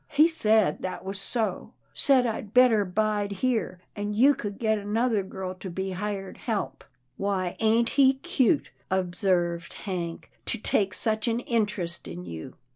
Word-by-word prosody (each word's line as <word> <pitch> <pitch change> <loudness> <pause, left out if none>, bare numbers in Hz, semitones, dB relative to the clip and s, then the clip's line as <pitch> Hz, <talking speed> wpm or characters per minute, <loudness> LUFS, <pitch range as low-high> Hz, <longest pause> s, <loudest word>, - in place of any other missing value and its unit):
He 305 +2 +5
said 220 - +2
that 185 - -5
was 195 0 -5
so, 215 -3 -2
— - - -41
said 265 -3 +4
I'd 220 -1 -4
better 245 -4 +6
bide 205 +1 0
here, 200 -5 -1
an' 205 0 -3
you 270 +6 +6
could 205 -6 -5
get 220 -2 +1
another 215 +2 +1
girl 190 -1 -6
to 185 +1 -8
be 190 +2 -3
hired 195 0 -4
help." 200 - -3 0.2
" - - -45
Why, 190 -3 -1
ain't 225 +1 +3
he 270 -1 +5
cute," 295 -1 +1 0.2
observed 180 -2 0
Hank, 175 -4 -5
" - - -42
to - - -1
take 195 -3 +1
such 220 +1 +2
an 230 0 +1
interest 210 -8 -1
in 85 +2 -7
you 80 -2 -8
205 Hz, 170 wpm, -27 LUFS, 185-230 Hz, 0.2 s, better